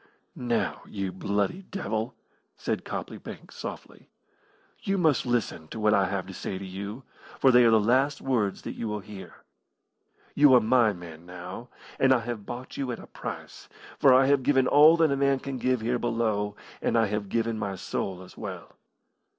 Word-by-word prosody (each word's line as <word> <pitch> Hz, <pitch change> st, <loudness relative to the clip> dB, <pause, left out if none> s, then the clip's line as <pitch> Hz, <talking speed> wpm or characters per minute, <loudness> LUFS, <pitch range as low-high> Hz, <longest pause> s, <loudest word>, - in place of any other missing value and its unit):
"Now, 120 Hz, -2 st, -1 dB
you 95 Hz, -2 st, -4 dB
bloody 100 Hz, -, -1 dB
devil," 125 Hz, -, -4 dB, 0.4 s
said -, -, -2 dB
Copley -, -, -5 dB
Banks, -, -, -10 dB
softly, -, -, -8 dB, 0.7 s
"you 195 Hz, -4 st, 0 dB
must 155 Hz, -7 st, +2 dB
listen 120 Hz, -9 st, -1 dB
to 110 Hz, -, -7 dB
what 105 Hz, 0 st, +3 dB
I 100 Hz, -2 st, +3 dB
have 95 Hz, -2 st, -2 dB
to 95 Hz, -, -9 dB
say 95 Hz, -, -4 dB
to 95 Hz, -, -7 dB
you, 100 Hz, +6 st, -6 dB, 0.3 s
for 135 Hz, -, +5 dB
they 125 Hz, 0 st, +7 dB
are -, -, +6 dB
the 110 Hz, -1 st, +5 dB
last 130 Hz, +6 st, +2 dB
words 115 Hz, -7 st, -1 dB
that -, -, -5 dB
you 115 Hz, -, -4 dB
will 105 Hz, -1 st, -3 dB
hear. 100 Hz, -1 st, -11 dB, 0.9 s
You 145 Hz, -2 st, +6 dB
are -, -, +8 dB
my 115 Hz, 0 st, +4 dB
man 85 Hz, -2 st, -10 dB
now, 90 Hz, +6 st, -8 dB, 0.3 s
and 130 Hz, 0 st, +5 dB
I 120 Hz, -, 0 dB
have 115 Hz, -3 st, -6 dB
bought 125 Hz, +1 st, -7 dB
you 135 Hz, -3 st, -2 dB
at 120 Hz, -, -4 dB
a -, -, -11 dB
price, -, -, -8 dB, 0.3 s
for 135 Hz, -, +6 dB
I 130 Hz, +1 st, +6 dB
have 140 Hz, 0 st, +3 dB
given 130 Hz, 0 st, +3 dB
all 150 Hz, +5 st, +7 dB
that 160 Hz, -3 st, +3 dB
a -, -, +2 dB
man 140 Hz, 0 st, +2 dB
can 135 Hz, -1 st, -5 dB
give 130 Hz, -2 st, +1 dB
here 120 Hz, +2 st, 0 dB
below, 110 Hz, -3 st, -1 dB, 0.3 s
and -, -, +1 dB
I 115 Hz, -, +4 dB
have 105 Hz, -1 st, -3 dB
given 115 Hz, 0 st, -1 dB
my 100 Hz, -2 st, -3 dB
soul 95 Hz, 0 st, -4 dB
as 90 Hz, -, -14 dB
well. -, -, -8 dB
115 Hz, 190 wpm, -27 LUFS, 100-130 Hz, 0.9 s, are